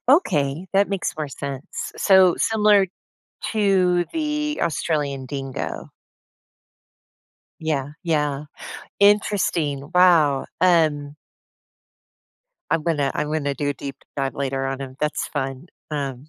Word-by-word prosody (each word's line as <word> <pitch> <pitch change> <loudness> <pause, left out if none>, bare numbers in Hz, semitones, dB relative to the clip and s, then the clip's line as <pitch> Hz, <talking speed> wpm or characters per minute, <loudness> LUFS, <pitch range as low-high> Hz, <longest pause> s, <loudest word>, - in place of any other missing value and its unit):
Okay, 165 - +2
that 200 +1 +3
makes 195 -3 -2
more 155 -2 -3
sense. 140 +1 -6
So, 190 -2 +5
similar 210 -3 +4 0.7
to 185 -5 +3
the 300 -1 -1
Australian 145 -4 -1
Dingo. 135 -1 -5 1.7
Yeah. 150 -4 -1 0.2
Yeah. 150 -3 0 0.6
Interesting. 180 -8 +2
Wow, 165 -7 +5
um 155 -5 +2 1.6
I'm 160 - +1
gonna 150 -4 0
I 150 - 0
wanna 150 -2 -1
do 145 +2 -2
a 145 - -3
deep 140 -2 -7 0.2
dive 135 -1 -1
later 135 -1 -2
on 135 0 -3
him. 130 -1 -7
That's 150 0 -1
fun. 135 +1 -4 0.2
Um, 140 -2 -4
150 Hz, 110 wpm, -22 LUFS, 140-185 Hz, 1.7 s, So